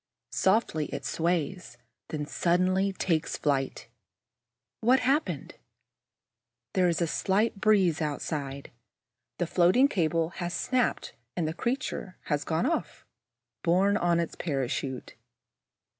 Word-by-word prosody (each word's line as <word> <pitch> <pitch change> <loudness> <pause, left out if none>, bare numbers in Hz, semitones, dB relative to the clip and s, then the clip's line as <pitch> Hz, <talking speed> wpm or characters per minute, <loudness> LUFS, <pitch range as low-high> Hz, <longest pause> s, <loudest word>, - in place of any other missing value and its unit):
Softly 190 -6 +2
it - - -6
sways, 170 -3 -1 0.3
then 150 -1 -3
suddenly 185 +5 +2
takes 165 -4 -1
flight. 135 -3 -1 0.9
What 250 +3 +4
has - - -3
happened? 280 +4 0 1.2
There 185 -3 +3
is 170 0 +1
a - - +3
slight 195 +5 0
breeze 190 -7 +3
outside. 140 -2 -3 0.7
The 175 - 0
floating 180 +11 +4
cable 165 - +1
has 175 0 -2
snapped 255 -2 0 0.2
and 170 -3 0
the 160 - -2
creature 235 - -3
has 145 -2 -1
gone 160 +8 0
off, 325 +3 -2 0.6
borne 190 - +3
on 175 -4 +2
its 170 - -2
parachute. 135 -3 -3
175 Hz, 115 wpm, -28 LUFS, 155-195 Hz, 1.2 s, What